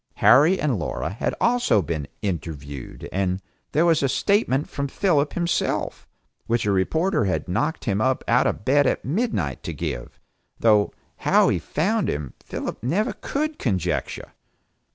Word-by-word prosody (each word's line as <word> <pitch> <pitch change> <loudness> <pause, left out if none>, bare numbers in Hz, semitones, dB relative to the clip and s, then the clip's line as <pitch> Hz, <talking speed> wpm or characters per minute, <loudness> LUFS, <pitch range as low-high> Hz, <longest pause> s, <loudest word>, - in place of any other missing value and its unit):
Harry 165 +7 +5
and 135 -9 0
Laura 80 - -3
had 100 - -2
also 240 - +3
been 80 -5 -3 0.2
"interviewed" 75 -8 -5
and 95 -1 0 0.3
there 160 +4 +3
was 165 -2 +4
a 135 - +2
statement 155 - +1
from 140 0 -3
Philip 150 -2 +1
himself, 175 -1 -1 0.4
which 115 -1 +1
a 105 - +2
reporter 160 - +1
had 95 - -1
knocked 150 - -1
him 105 -3 0
up 130 +2 +1
out - - +4
of - - -3
bed 145 +1 +4
at - - -1
midnight 140 - -1
to - - -5
give, - - -5 0.4
though 105 -3 +4 0.3
how - - +4
he - - +1
found 190 - 0
him, 75 -3 -3
Philip - - -5
never 190 - 0
could 305 +2 -3
conjecture. 95 -8 -2
130 Hz, 155 wpm, -24 LUFS, -, 0.4 s, Harry